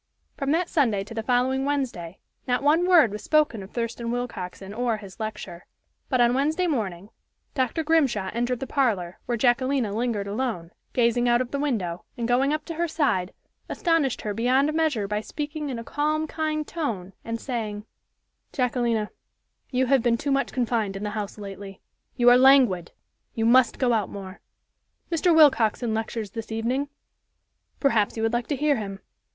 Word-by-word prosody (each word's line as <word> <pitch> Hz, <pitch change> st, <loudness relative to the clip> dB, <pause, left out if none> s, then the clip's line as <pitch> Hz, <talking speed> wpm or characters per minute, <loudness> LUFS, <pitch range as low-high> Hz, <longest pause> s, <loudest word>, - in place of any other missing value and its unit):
From 275 Hz, -, -3 dB
that 335 Hz, +4 st, +2 dB
Sunday 230 Hz, -, +1 dB
to 215 Hz, -, -10 dB
the 225 Hz, -, -2 dB
following 255 Hz, +3 st, +1 dB
Wednesday, 255 Hz, -12 st, -2 dB, 0.3 s
not 250 Hz, +1 st, 0 dB
one 320 Hz, +5 st, +3 dB
word 330 Hz, -, +6 dB
was 210 Hz, -, -6 dB
spoken 305 Hz, -8 st, +2 dB
of 190 Hz, -, -10 dB
Thurston 230 Hz, 0 st, -3 dB
Willcoxen 205 Hz, -5 st, -5 dB
or 235 Hz, 0 st, 0 dB
his 200 Hz, -1 st, -12 dB
lecture. 215 Hz, -5 st, -6 dB, 0.4 s
But 255 Hz, -, +1 dB
on 240 Hz, 0 st, +4 dB
Wednesday 310 Hz, +7 st, +1 dB
morning 205 Hz, -, -2 dB, 0.4 s
Dr. 260 Hz, +3 st, 0 dB
Grimshaw 270 Hz, -, +1 dB
entered 240 Hz, +2 st, -1 dB
the -, -, -2 dB
parlor, 220 Hz, -, 0 dB
where 240 Hz, -, 0 dB
Jacquelina 250 Hz, -2 st, +1 dB
lingered 225 Hz, -2 st, -1 dB
alone, 200 Hz, -6 st, -3 dB, 0.2 s
gazing 240 Hz, 0 st, +2 dB
out 240 Hz, 0 st, +4 dB
of 250 Hz, -1 st, -3 dB
the 280 Hz, -, -2 dB
window, 200 Hz, -12 st, -2 dB
and 235 Hz, -1 st, -2 dB
going 255 Hz, +4 st, +2 dB
up 305 Hz, 0 st, -2 dB
to 335 Hz, -, -5 dB
her 340 Hz, +2 st, -1 dB
side, 275 Hz, -, 0 dB, 0.4 s
astonished 330 Hz, -7 st, +1 dB
her 210 Hz, -, -3 dB
beyond 260 Hz, +7 st, +2 dB
measure 305 Hz, -10 st, +1 dB
by 210 Hz, +1 st, -1 dB
speaking 295 Hz, +4 st, -5 dB
in 255 Hz, -, -3 dB
a 230 Hz, -, -6 dB
calm, 305 Hz, +5 st, -1 dB
kind 310 Hz, -1 st, -2 dB
tone, 210 Hz, -, -4 dB
and 230 Hz, 0 st, -4 dB
saying: 215 Hz, -5 st, -4 dB, 0.7 s
"Jacquelina, 240 Hz, -4 st, 0 dB, 0.6 s
you 260 Hz, 0 st, +1 dB
have 270 Hz, 0 st, +3 dB
been 235 Hz, 0 st, +2 dB
too 285 Hz, +4 st, -2 dB
much 275 Hz, 0 st, +1 dB
confined 230 Hz, -5 st, -1 dB
to -, -, -4 dB
the 210 Hz, +1 st, -3 dB
house 205 Hz, -1 st, -5 dB
lately. 195 Hz, -1 st, -8 dB, 0.4 s
You 245 Hz, -1 st, +2 dB
are 245 Hz, -, +7 dB
languid. 255 Hz, -10 st, +5 dB, 0.4 s
You 225 Hz, -, 0 dB
must 245 Hz, +1 st, +5 dB
go 250 Hz, -2 st, +2 dB
out 215 Hz, -4 st, 0 dB
more. 195 Hz, -1 st, -8 dB, 0.7 s
Mr. 345 Hz, +2 st, +2 dB
Willcoxen 240 Hz, -6 st, +4 dB
lectures 220 Hz, -2 st, -3 dB
this 225 Hz, 0 st, -7 dB
evening. 250 Hz, +6 st, -1 dB, 0.9 s
Perhaps 230 Hz, -7 st, +2 dB
you 220 Hz, -, -2 dB
would 225 Hz, +1 st, +1 dB
like 240 Hz, 0 st, -1 dB
to 290 Hz, -, -1 dB
hear 290 Hz, 0 st, +2 dB
him. 195 Hz, -3 st, -5 dB
240 Hz, 175 wpm, -25 LUFS, 215-280 Hz, 0.9 s, are